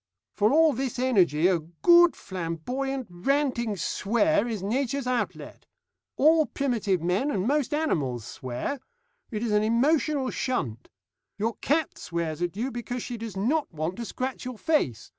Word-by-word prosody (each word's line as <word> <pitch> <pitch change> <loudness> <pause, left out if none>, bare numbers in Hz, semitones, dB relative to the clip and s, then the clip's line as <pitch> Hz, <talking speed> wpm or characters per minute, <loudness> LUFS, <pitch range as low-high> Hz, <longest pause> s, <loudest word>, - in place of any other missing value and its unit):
For 210 +2 +2
all 315 +1 +5
this 260 0 -3
energy 185 - +3
a 185 -3 +2
good 345 - +5
flamboyant, 220 - -4
ranting 235 +2 0
swear 235 - +1
is 215 -5 -4
Nature's 260 +5 -1
outlet. 250 -1 -3 0.5
All 315 +1 +5
primitive 220 - -1
men 185 +11 +1
and 195 -8 -1
most 290 -1 +1
animals 145 - -1
swear. 130 - -4 0.5
It 215 -2 -3
is 230 - -1
an 210 0 +3
emotional 270 +4 +2
shunt. 130 - -3 0.5
Your 225 +3 0
cat 310 +2 0
swears 170 -2 -3
at 175 +2 -2
you 250 +5 -2
because 240 0 -4
she 245 - -5
does 225 -4 -6
not 275 +10 0
want 160 +2 -3
to 235 - -4
scratch 255 +3 -4
your 255 -2 -6
face. 135 - 0
235 Hz, 150 wpm, -27 LUFS, 180-275 Hz, 0.5 s, all